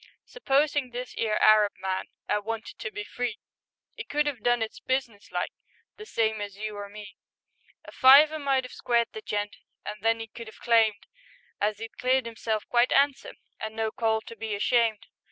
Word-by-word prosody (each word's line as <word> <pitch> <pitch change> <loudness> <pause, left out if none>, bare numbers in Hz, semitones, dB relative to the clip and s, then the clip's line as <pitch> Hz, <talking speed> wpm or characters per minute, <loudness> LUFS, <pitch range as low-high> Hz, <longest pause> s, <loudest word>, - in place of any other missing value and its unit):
Supposin' 290 - +1
this 245 +1 -6
'ere 215 -2 0
Arab 215 -1 +6
man 190 0 -2 0.2
'Ad 210 - 0
wanted 225 +1 -5
to - - -4
be 210 -1 -6
free, 245 +1 -4 0.6
'E 460 - -4
could 295 0 0
'ave 280 -5 -2
done 240 +1 +2
it 220 - -7
businesslike, 250 -6 -2 0.5
The 430 0 -10
same 220 - 0
as 200 -1 -6
you 215 0 -5
or 205 0 -6
me; 205 -1 -11 0.7
A - - -10
fiver 295 +4 +7
might 270 -2 +1
'ave 250 - -10
squared 235 -1 +1
the 440 - -6
gent, 205 - -3 0.3
An' 210 - -5
then 225 +1 +2
'e 225 - -4
could 230 +1 -10
'ave - - -16
claimed 225 -3 +2 0.5
As 210 0 0
'e'd 225 0 -9
cleared 255 0 +2
'imself 225 -2 -3
quite 240 +1 +3
'andsome, 280 0 +2 0.2
And 220 0 -5
no 220 -1 -1
call 220 -3 0
to 230 - -11
be 220 -2 -4
ashamed. 225 0 +1
225 Hz, 185 wpm, -27 LUFS, 215-255 Hz, 0.7 s, fiver